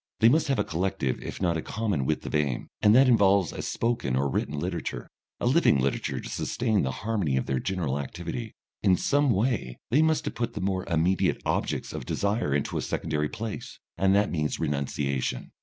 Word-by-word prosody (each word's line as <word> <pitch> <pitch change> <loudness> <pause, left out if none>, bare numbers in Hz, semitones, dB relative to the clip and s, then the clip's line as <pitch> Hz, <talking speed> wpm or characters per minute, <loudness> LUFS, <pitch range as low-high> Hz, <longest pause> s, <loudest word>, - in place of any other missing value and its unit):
They 115 - +7
must 155 +5 +3
have 135 -2 +1
a - - +2
collective 80 -6 -1
if - - -6
not 85 -3 +1
a - - -2
common 100 -12 -2
width 80 - -1
of - - -5
aim, 70 -5 0
and 105 +1 +6
that 135 +1 +7
involves 100 -7 +4
a - - -5
spoken 115 - -1
or 70 +2 +1
written 70 +3 -1
literature, - - -4 0.3
a - - -2
living 125 - +4
literature 70 +1 -1
to - - -7
sustain 110 -4 0
the 65 - 0 0.2
harmony 100 -12 0
of 65 - 0
their 65 -1 0
general 85 -7 -1
activity. 85 - -5 0.3
In 95 -3 +4
some 145 +6 +2
way 105 - 0
they 140 +5 +5
must 160 0 +2
have - - -3
put 120 -1 -3
the - - -3
more 95 -1 -1
immediate 85 +2 +1
objects - - -1
of 60 - -6
desire 100 -5 0
into 70 0 0
a - - -2
secondary 75 -2 -1
place, 110 -1 -6 0.2
and 95 0 +3
that 105 +1 +2
means 75 -3 -1
renunciation. 70 -2 -2
95 Hz, 200 wpm, -27 LUFS, 70-115 Hz, 0.3 s, They